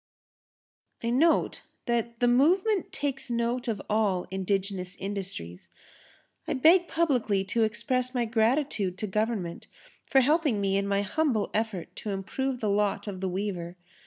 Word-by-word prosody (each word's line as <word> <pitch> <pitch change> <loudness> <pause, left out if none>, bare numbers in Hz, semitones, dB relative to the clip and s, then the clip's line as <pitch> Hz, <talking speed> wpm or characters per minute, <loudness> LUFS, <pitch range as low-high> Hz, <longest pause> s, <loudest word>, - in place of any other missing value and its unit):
I 230 - 0
note 320 +7 +2 0.2
that 235 0 -1
the 245 - +4
movement 360 - +3
takes 275 -3 -3
note 235 +1 -1
of 220 -4 -1
all 205 -4 +1
indigenous 190 -1 -2
industries. 190 - -6 0.8
I - - 0
beg 340 +6 +5
publicly 245 -12 +1
to 205 +4 -1
express 255 +3 0
my 240 -1 +1
gratitude 225 -4 +1
to 215 - -3
Government 210 -4 -2 0.4
for 270 - +5
helping 295 -4 +2
me 195 -1 +1
in 200 0 0
my 200 0 +1
humble 230 0 0
effort 215 -5 -2
to 215 - -5
improve 245 +7 -3
the 215 - 0
lot 205 0 +1
of 195 -3 -6
the 190 - -1
weaver. 180 -2 -4
220 Hz, 145 wpm, -28 LUFS, 195-255 Hz, 0.8 s, beg